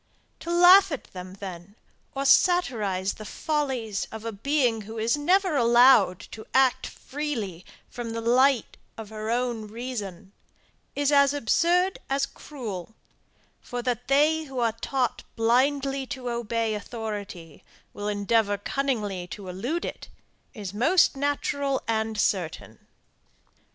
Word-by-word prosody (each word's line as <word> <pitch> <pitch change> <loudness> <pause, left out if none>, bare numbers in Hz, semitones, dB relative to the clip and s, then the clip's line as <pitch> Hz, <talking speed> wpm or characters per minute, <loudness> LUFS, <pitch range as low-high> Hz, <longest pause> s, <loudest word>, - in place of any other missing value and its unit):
To - - -8
laugh 360 +2 +7
at 285 - -4
them 185 0 -8
then, 190 0 -9 0.4
or 275 +1 -2
satirize 215 - +3
the 215 - -10
follies 255 -6 -2
of 220 0 -8
a 230 - -2
being 240 +1 0
who 220 +2 -9
is 225 +3 +1
never 370 +6 +2
to 310 - -1
be - - +3
allowed 235 -5 +5
to 220 - -10
act 260 -1 +3
freely 235 - -5 0.2
from 240 -2 -6
the 230 0 -4
light 250 +2 +2 0.2
of 220 -2 -8
her 215 0 -5
own 235 -2 -1
reason, 210 -5 -6 0.6
is 285 0 +1
as 280 0 +4
absurd 345 - +2
as 275 0 +1
cruel; 220 - -8 0.7
for 245 -1 -5
that 245 0 -2
they 305 +4 +3
who 270 -2 -9
are 235 -2 +2
taught 250 +2 -2
blindly 270 +4 +1
to 250 -1 -5
obey 230 -1 -1
authority, 205 -7 -7 0.3
will 205 - -5
endeavour 205 0 +1
cunningly 205 -6 -2
to 195 0 -8
elude 245 - -3
it, - - -7 0.5
is 200 -4 -6
most 295 - +3
natural 285 -1 -1
and 220 -1 -1
certain. 180 -6 -2
235 Hz, 135 wpm, -26 LUFS, 210-275 Hz, 0.7 s, laugh